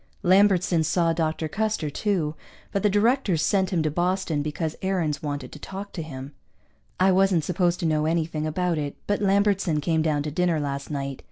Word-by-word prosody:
Lambertson 185 -3 +4
saw 165 +1 +2
Dr. 160 -1 -1
Custer, 210 -4 -1
too, 175 -5 -1 0.4
but 200 - 0
the 210 - +3
directors 205 - +2
sent 190 0 +2
him 170 -4 0
to 155 - 0
Boston 175 -2 0
because 155 +2 -3
Aarons 180 -6 -1
wanted 145 -4 -4
to 150 - -10
talk 195 +5 -7
to 170 - -4
him. 140 -2 -8 0.7
I 190 +1 +5
wasn't 185 -3 +3
supposed 175 +1 0
to - - -1
know 155 -1 +1
anything 160 -1 -1
about 170 +1 0
it, 145 -1 -4
but 205 0 0
Lambertson 200 -4 +2
came 160 +2 +1
down 150 -2 0
to 150 - -4
dinner 175 0 +1
last 140 -1 -4
night. 140 -2 -4
165 Hz, 185 wpm, -25 LUFS, 150-190 Hz, 0.7 s, I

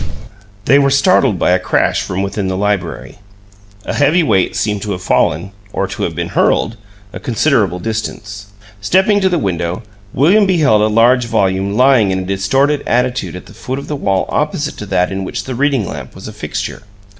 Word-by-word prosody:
BANG! - - -6 0.5
They 140 +4 +5
were 140 -1 +3
startled 140 - +3
by 90 - +1
a 90 - +3
crash 90 - +1
from 95 +2 -3
within 100 0 -3
the 95 0 -2
library; 100 -2 -3 0.7
a - - -3
heavy 155 +5 +3
weight 95 - +1
seemed 105 -2 -1
to 105 0 -3
have 90 - -7
fallen 85 +3 +1 0.2
(or - - -1
to - - -6
have - - -2
been - - -3
hurled) 110 - +1 0.4
a - - -6
considerable 115 - +1
distance. 105 -1 -5 0.3
Stepping 190 - +2
to 190 - +3
the 180 - +1
window, 90 - -2 0.3
William 195 - +3
beheld 150 - +3
a 105 - +3
large 120 +3 +3
volume 100 -1 0
lying 130 -5 +4
in 95 - 0
a 95 - -4
distorted 135 +10 +1
attitude 125 -7 0
at 90 - -9
the - - -15
foot 125 +4 -5
of 140 - -7
the 150 - -3
wall 100 -8 0
opposite - - -2
to - - -7
that 90 +1 0
in 95 0 -3
which 95 - -4
the 130 - -5
reading 135 -5 0
lamp 70 -4 -8
was - - -9
a - - -8
fixture. - - -5
105 Hz, 200 wpm, -15 LUFS, 95-140 Hz, 0.7 s, They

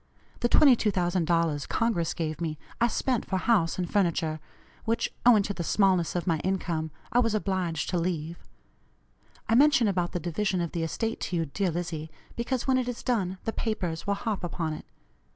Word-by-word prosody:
The 240 - +1
$22,000 175 - +3
Congress 200 -8 0
gave 155 -1 -3
me 155 -2 -2 0.2
I 235 - +5
spent 245 0 0
for 190 - -2
house 185 -5 +2
and 180 -1 -1
furniture, 170 -5 0 0.4
which, 230 0 -1
owing 220 -4 +7
to 200 - -3
the 175 - -4
smallness 185 -2 +2
of 175 - -1
my 165 -4 +1
income, 170 -4 -1 0.2
I 245 - +4
was 230 -3 +2
obliged 185 -6 -1
to 180 - +1
leave. 165 -1 -2 1.1
I - - +1
mention 265 -2 +5
about 180 -3 0
the 175 - -1
division 185 +3 -1
of 170 -2 -2
the 170 - -2
estate 225 +8 -2
to 180 - -3
you, 165 -1 +1
dear 185 +6 -1
Lizzie, 165 -2 -4 0.3
because 240 +1 -2
when 260 -1 +3
it 250 - -2
is 245 - -6
done 195 -7 0
the 225 - -2
papers 180 -8 -3
will 200 - +2
harp 205 -2 -3
upon 165 -2 -2
it. 155 - -9
185 Hz, 185 wpm, -28 LUFS, 165-220 Hz, 1.1 s, owing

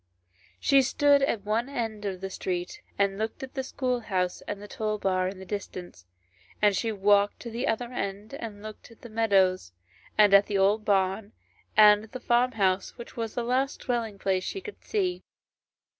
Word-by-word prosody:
She 275 -1 +5
stood 285 +2 +3
at 230 -7 0
one 225 +5 0
end 225 -6 -4
of 190 -2 -4
the 195 0 -5
street 180 -1 -4 0.2
and 200 0 +1
looked 220 +5 -3
at 265 - -8
the 270 - -2
schoolhouse 235 -9 -2
and 205 - -4
the 205 - -9
toll 215 -3 -2
bar 185 -2 0
in 190 +1 -5
the 190 - -10
distance, 180 - -7 0.5
and 205 -2 +4
she 225 +3 -1
walked 205 0 +3
to 235 - -7
the 235 +3 -2
other 240 +2 -2
end 200 +1 -4
and 215 -6 -7
looked 215 +2 -10
at 230 - -18
the 240 - -9
meadows, 195 - +2 0.4
and 210 -2 +6
at 200 0 +6
an 200 - +1
old 205 +3 +2
barn, 195 +1 +1 0.4
and 210 0 +7
at 220 - -22
the 255 - -5
farm 245 +1 +2
house, 195 -1 0
which 235 - -10
was 225 -2 -4
the 240 - -1
last 260 +3 0
dwelling 230 -5 -2
place 190 -1 0
she 390 - -4
could 420 +2 -10
see. 375 -4 -1
215 Hz, 190 wpm, -27 LUFS, 195-240 Hz, 0.5 s, and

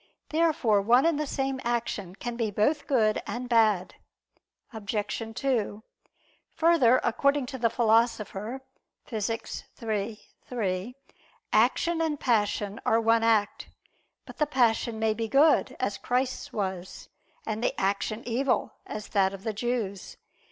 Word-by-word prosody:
Therefore 300 -10 +2
one 240 +7 +4
and 330 -3 +2
the 300 - -1
same 270 -1 -2
action 225 -6 -2
can 240 +3 -5
be 230 -2 -1
both 250 +9 0
good 220 -6 +2
and 245 +1 -4
bad. 215 -6 +3 0.8
Obj. 220 -1 -5 0.4
2: 225 -6 -1 0.7
Further, 315 -7 +4
according 280 +3 +2
to 265 0 -7
the 230 -1 +3
Philosopher 230 0 +1 0.4
(Phys. 225 -1 -3 0.2
iii, 215 -1 -3 0.3
3), 210 -1 -2 0.6
action 340 -1 +3
and 310 -3 -1
passion 210 -3 0
are 225 - +3
one 230 0 +3
act. 220 -3 +1 0.6
But - - -12
the 300 - +1
passion 235 -4 +1
may 220 0 +1
be 225 +1 -3
good, 280 +7 +4
as - - -2
Christ's 255 +1 -1
was; 190 -3 -5 0.4
and 220 +1 -3
the - - -1
action 200 +3 -1
evil, 250 +2 0
as 215 0 -6
that 195 -1 +2
of 195 - -13
the 220 - -2
Jews. 220 -3 -3
230 Hz, 135 wpm, -27 LUFS, 210-255 Hz, 0.8 s, one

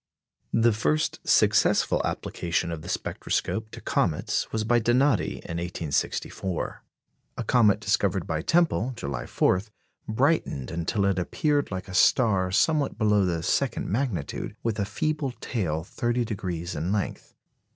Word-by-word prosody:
The 115 0 +4
first 150 +8 0
successful - - +3
application 85 0 -2
of 80 -2 -5
the - - -9
spectroscope 110 0 -2
to - - -9
comets 75 - 0
was 110 -1 -1
by 120 +2 +3
Donati 120 +1 +2
in 85 - -6
1864. 85 +1 -3 0.5
A 120 - -2
comet 110 -3 +4
discovered - - +1
by 80 0 -2
Tempel, 155 - +2
July 70 -9 -4
4, 90 - +2 0.5
brightened 110 - 0
until 85 +5 -1
it 100 -2 +1
appeared 145 - 0
like 95 -1 -5
a 95 - -8
star 95 -1 +3
somewhat 145 - +2
below 105 -3 +3
the 85 -2 -1
second - - 0
magnitude, 105 - -2
with 110 -2 -1
a 100 - +1
feeble 140 +6 -2
tail 80 -12 -2
30° 95 -6 -2
in 80 +5 -2
length. 105 -2 -3
105 Hz, 135 wpm, -26 LUFS, 85-120 Hz, 0.5 s, The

